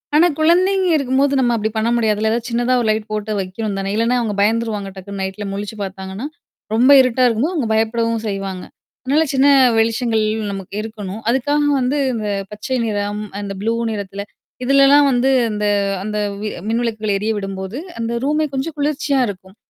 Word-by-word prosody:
ஆனா 330 Hz, +4 st, +6 dB
குழந்தைங்க 370 Hz, +4 st, +3 dB
இருக்கும்போது 275 Hz, 0 st, +1 dB
நம்ம 240 Hz, -2 st, +2 dB
அப்படி 220 Hz, -1 st, -1 dB
பண்ண 220 Hz, +2 st, +1 dB
முடியாதுல! 220 Hz, -2 st, +1 dB
ஏதாவது 235 Hz, +1 st, -2 dB
சின்னதா 240 Hz, +2 st, +1 dB
ஒரு 230 Hz, -, -1 dB
லைட் 215 Hz, 0 st, -3 dB
போட்டு 215 Hz, 0 st, -3 dB
வைக்கணும் 195 Hz, +2 st, -4 dB
தானே! 195 Hz, 0 st, -3 dB
இல்லனா 230 Hz, +3 st, +2 dB
அவங்க 210 Hz, -3 st, -2 dB
பயந்துருவாங்க. 215 Hz, -2 st, 0 dB
டக்குன்னு 195 Hz, +1 st, -7 dB
நைட்ல 190 Hz, +2 st, -4 dB
முழிச்சு 205 Hz, +2 st, -5 dB
பாத்தாங்கன்னா, 190 Hz, +3 st, -6 dB, 0.5 s
ரொம்ப 250 Hz, +5 st, +5 dB
இருட்டா 255 Hz, 0 st, +1 dB
இருக்கும்போது 245 Hz, +10 st, 0 dB
அவுங்க 270 Hz, -9 st, 0 dB
பயப்படவும் 225 Hz, +1 st, 0 dB
செய்வாங்க. 195 Hz, -2 st, -4 dB, 0.4 s
அதனால 285 Hz, +5 st, +2 dB
சின்ன 270 Hz, +1 st, +4 dB, 0.3 s
வெளிச்சங்கள், 225 Hz, 0 st, +1 dB, 0.3 s
நமக்கு 195 Hz, 0 st, -7 dB
இருக்கணும். 215 Hz, -2 st, -7 dB
அதுக்காக 290 Hz, +4 st, +1 dB, 0.2 s
வந்து 255 Hz, +3 st, 0 dB, 0.2 s
அந்தப் 205 Hz, -3 st, -3 dB
பச்சை 210 Hz, +5 st, -3 dB
நிறம், 205 Hz, 0 st, -2 dB, 0.2 s
அந்த 200 Hz, -1 st, -5 dB
ப்ளூ 225 Hz, +2 st, 0 dB, 0.2 s
நிறத்தில 200 Hz, -1 st, -5 dB, 0.4 s
இதுலல்லாம் 275 Hz, +2 st, +5 dB
வந்து 250 Hz, +1 st, +2 dB, 0.2 s
அந்த 210 Hz, 0 st, -2 dB, 0.4 s
அந்த 210 Hz, +1 st, -3 dB, 0.5 s
மின்விளக்குகள் 220 Hz, -2 st, -1 dB
எரியவிடும்போது, 195 Hz, 0 st, -3 dB, 0.2 s
அந்த 230 Hz, 0 st, -2 dB
ரூமே 300 Hz, +2 st, +1 dB
கொஞ்சம் 275 Hz, +4 st, -3 dB
குளிர்ச்சியா 285 Hz, -1 st, 0 dB
இருக்கும். 190 Hz, -1 st, -9 dB
225 Hz, 155 wpm, -19 LUFS, 205-255 Hz, 0.5 s, ஆனா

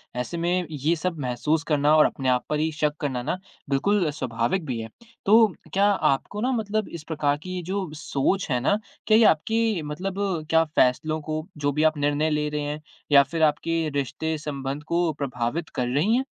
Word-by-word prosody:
ऐसे 125 Hz, +7 st, -3 dB
में 175 Hz, +2 st, 0 dB
ये 155 Hz, +2 st, 0 dB
सब 170 Hz, +1 st, -3 dB
महसूस 145 Hz, +5 st, 0 dB
करना 150 Hz, -1 st, +3 dB
और 155 Hz, -, +7 dB
अपने 130 Hz, -2 st, -1 dB
आप 125 Hz, -1 st, +1 dB
पर 150 Hz, -, 0 dB
ही 160 Hz, +1 st, 0 dB
शक़ 150 Hz, -1 st, 0 dB
करना 130 Hz, -4 st, -1 dB
ना 155 Hz, +7 st, -1 dB, 0.3 s
बिल्कुल 175 Hz, +6 st, +2 dB
स्वाभाविक 130 Hz, +4 st, -1 dB
भी 125 Hz, -5 st, -3 dB
है। 115 Hz, 0 st, -6 dB, 0.4 s
तो 220 Hz, +2 st, +7 dB, 0.3 s
क्या 195 Hz, +1 st, +3 dB, 0.3 s
आपको 205 Hz, +9 st, -5 dB
ना 255 Hz, +3 st, +1 dB
मतलब 215 Hz, -3 st, -1 dB
इस 165 Hz, -2 st, -8 dB
प्रकार 150 Hz, -3 st, 0 dB
की 185 Hz, 0 st, -5 dB
ये 180 Hz, -, -3 dB
जो 190 Hz, 0 st, -3 dB
सोच 155 Hz, +6 st, -1 dB
है 125 Hz, -, +2 dB
ना, 170 Hz, +11 st, +2 dB, 0.3 s
क्या 215 Hz, -, +6 dB
ये 230 Hz, -, +6 dB
आपकी 220 Hz, +4 st, +2 dB
मतलब 185 Hz, +5 st, -4 dB, 0.3 s
क्या 165 Hz, 0 st, +5 dB
फैसलों 155 Hz, +5 st, +2 dB
को 155 Hz, +1 st, -4 dB
जो 145 Hz, -1 st, 0 dB
भी 150 Hz, +2 st, 0 dB
आप 155 Hz, -1 st, +3 dB
निर्णय 145 Hz, +2 st, +1 dB
ले 150 Hz, -1 st, 0 dB
रहे 150 Hz, 0 st, -2 dB
हैं, 145 Hz, +1 st, -4 dB, 0.3 s
या 140 Hz, -1 st, +8 dB
फिर 165 Hz, +3 st, -2 dB
आपके 155 Hz, +2 st, +1 dB, 0.2 s
रिश्ते 145 Hz, +3 st, -2 dB
संबंध 140 Hz, -1 st, -5 dB
को 170 Hz, -1 st, +1 dB
प्रभावित 135 Hz, +3 st, -2 dB
कर 125 Hz, -, 0 dB
रहीं 195 Hz, +11 st, +3 dB
हैं? 265 Hz, -, -1 dB
155 Hz, 200 wpm, -25 LUFS, 145-175 Hz, 0.4 s, या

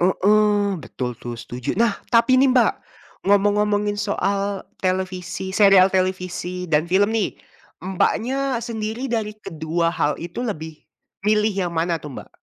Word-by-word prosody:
heeh, 205 Hz, +2 st, +3 dB
betul 125 Hz, +1 st, -4 dB
tuh 120 Hz, -, -7 dB
setuju. 120 Hz, +1 st, -8 dB
Nah 230 Hz, -4 st, +3 dB, 0.2 s
tapi 235 Hz, +2 st, +5 dB
nih, 270 Hz, +1 st, +5 dB
Mbak 250 Hz, -2 st, +4 dB, 0.5 s
ngomong-ngomongin 205 Hz, +1 st, +2 dB
soal 200 Hz, -1 st, -1 dB, 0.2 s
televisi 185 Hz, 0 st, -2 dB
serial 195 Hz, -2 st, +7 dB
televisi 185 Hz, -1 st, -2 dB
dan 155 Hz, 0 st, +2 dB
film 190 Hz, +4 st, +2 dB
nih, 215 Hz, -, 0 dB, 0.5 s
Mbaknya 245 Hz, +8 st, 0 dB
sendiri 230 Hz, +2 st, -4 dB
dari 220 Hz, -2 st, -2 dB
kedua 165 Hz, 0 st, -2 dB
hal 150 Hz, -3 st, 0 dB
itu 175 Hz, +8 st, -5 dB
lebih 160 Hz, -8 st, -5 dB, 0.5 s
milih 210 Hz, 0 st, +3 dB
yang 175 Hz, -, -3 dB
mana 165 Hz, +1 st, 0 dB
tuh, 150 Hz, -3 st, -9 dB
Mbak? -, -, -9 dB
195 Hz, 135 wpm, -22 LUFS, 175-215 Hz, 0.5 s, serial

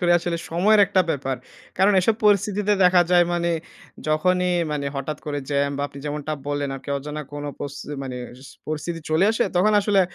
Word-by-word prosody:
করে 175 Hz, -1 st, +3 dB
আসলে 170 Hz, 0 st, -2 dB
সময়ের 205 Hz, +6 st, +4 dB
একটা 190 Hz, -, +2 dB
ব্যাপার। 135 Hz, -2 st, -2 dB, 0.4 s
কারণ 195 Hz, +2 st, +5 dB
এসব 215 Hz, +4 st, +2 dB
পরিস্থিতিতে 210 Hz, 0 st, +3 dB
দেখা 180 Hz, -1 st, +6 dB
যায়, 175 Hz, -1 st, +6 dB
মানে 170 Hz, 0 st, 0 dB, 0.6 s
যখনই 180 Hz, +4 st, +2 dB, 0.2 s
মানে 140 Hz, -1 st, -2 dB
হঠাৎ 150 Hz, +2 st, -4 dB
করে 145 Hz, -1 st, -2 dB
জ্যাম 140 Hz, 0 st, +1 dB
বা 140 Hz, -, -2 dB
আপনি 140 Hz, -, -12 dB
যেমনটা 150 Hz, +1 st, -3 dB, 0.2 s
বললেন, 145 Hz, -1 st, -1 dB
আরকি 140 Hz, -, -9 dB
অজানা 150 Hz, +2 st, -6 dB
কোন 145 Hz, 0 st, -5 dB
পচতি 145 Hz, +1 st, -6 dB
মানে 130 Hz, -2 st, -5 dB, 0.5 s
পরিস্থিতি, 155 Hz, +2 st, -4 dB
চলে 160 Hz, +5 st, +3 dB
আসে, 225 Hz, +1 st, +1 dB
তখন 210 Hz, +4 st, +4 dB
আসলে, 200 Hz, -1 st, +3 dB
165 Hz, 175 wpm, -23 LUFS, 145-185 Hz, 0.6 s, দেখা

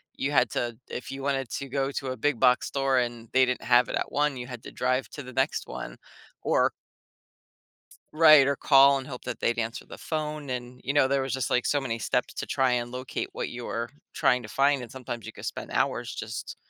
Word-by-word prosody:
you 140 Hz, -, -2 dB
had 145 Hz, -, +4 dB
to 120 Hz, -2 st, -2 dB
if 125 Hz, -, -6 dB
you 135 Hz, 0 st, -6 dB
wanted 135 Hz, -2 st, 0 dB
to 140 Hz, -, -4 dB
go 135 Hz, +1 st, -1 dB
to 140 Hz, -1 st, -4 dB
a 130 Hz, -, -4 dB
big 145 Hz, +3 st, +1 dB
box 125 Hz, -1 st, +4 dB
store 135 Hz, -1 st, +1 dB
and 120 Hz, -2 st, -3 dB
they 130 Hz, 0 st, +6 dB
didn't 125 Hz, 0 st, -2 dB
have 120 Hz, +1 st, +5 dB
it -, -, -2 dB
at -, -, -2 dB
one, 145 Hz, -1 st, +1 dB
you 125 Hz, 0 st, -6 dB
had 125 Hz, -2 st, -8 dB
to -, -, -9 dB
drive 130 Hz, +1 st, 0 dB
to 145 Hz, -, -8 dB
the 130 Hz, 0 st, -10 dB
next 130 Hz, -, 0 dB
next 135 Hz, +5 st, 0 dB
one -, -, -6 dB, 0.5 s
or -, -, +2 dB, 1.2 s
T -, -, -16 dB, 0.2 s
Right, 155 Hz, -3 st, +7 dB
or 140 Hz, -, +2 dB
call 140 Hz, 0 st, +6 dB
and 130 Hz, -1 st, -6 dB
hope 125 Hz, -3 st, -8 dB
that 125 Hz, -2 st, -4 dB
they'd 120 Hz, -, +1 dB
answer 115 Hz, 0 st, -3 dB
the -, -, -10 dB
phone, 150 Hz, -2 st, -4 dB
and, 125 Hz, 0 st, -5 dB
you 140 Hz, -, -1 dB
know, 145 Hz, -2 st, +4 dB
there 140 Hz, 0 st, +1 dB
was 135 Hz, 0 st, -2 dB
just, 130 Hz, -3 st, -1 dB
like, 125 Hz, -, +1 dB
so, 145 Hz, -, +2 dB
many 115 Hz, -4 st, -3 dB
steps -, -, -1 dB
to -, -, -3 dB
try 130 Hz, -1 st, +1 dB
and 120 Hz, 0 st, -1 dB
locate 125 Hz, 0 st, -4 dB
what -, -, -3 dB
you 120 Hz, 0 st, -7 dB
were 115 Hz, +1 st, -3 dB, 0.2 s
trying 125 Hz, 0 st, +2 dB
to 110 Hz, -, -9 dB
find, 140 Hz, +2 st, +2 dB
and 120 Hz, -, -9 dB
sometimes 120 Hz, -3 st, -6 dB
you -, -, -7 dB
could -, -, -9 dB
spend -, -, -5 dB
hours -, -, 0 dB
just -, -, -6 dB
130 Hz, 245 wpm, -27 LUFS, 125-140 Hz, 1.2 s, Right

